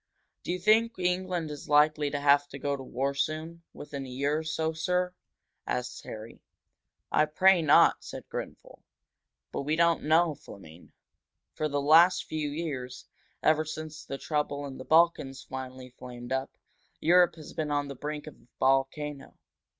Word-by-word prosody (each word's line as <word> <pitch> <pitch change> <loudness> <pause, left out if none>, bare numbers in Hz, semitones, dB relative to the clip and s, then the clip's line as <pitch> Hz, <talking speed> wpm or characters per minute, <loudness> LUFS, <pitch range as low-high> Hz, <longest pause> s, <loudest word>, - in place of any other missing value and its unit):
"Do - - -4
you 180 - -1
think 220 +5 +3
England 180 -3 -1
is 145 0 -9
likely 150 0 +4
to 145 0 -3
have 145 0 +4
to 140 - -9
go 140 +1 -1
to 135 - -8
war 135 +2 -2
soon 155 +4 -3
within 140 -2 -7
a - - -9
year 140 +4 0
or - - -5
so, 160 0 -1
sir?" 180 +3 -1 0.5
asked 125 0 -3
Harry. 110 +1 -9 0.7
"I 150 - +4
pray 185 +4 +4
not," 155 - +5
said - - -9
Grenfel. - - -8 0.7
"But - - -3
we 150 +3 0
don't 170 0 +3
know, 160 +1 +3
Fleming. 90 - -14 0.6
For 155 - -1
the 145 0 0
last 165 +5 +6
few 155 -2 -3
years 145 -5 -5 0.4
ever 155 0 +4
since 155 0 -7
the 135 - -6
trouble 145 -1 -2
in 135 -2 -8
the 130 - -8
Balkans 160 -5 +3
finally 130 -1 -8
flamed 120 -1 -9
up 130 0 -2 0.4
Europe 175 +1 +4
has 155 -3 -11
been 155 -2 -2
on 145 -1 0
the 140 - -6
brink 150 +2 -5
of 155 - -9
a 115 - -26
volcano. 135 +2 0
150 Hz, 165 wpm, -29 LUFS, 135-160 Hz, 0.7 s, last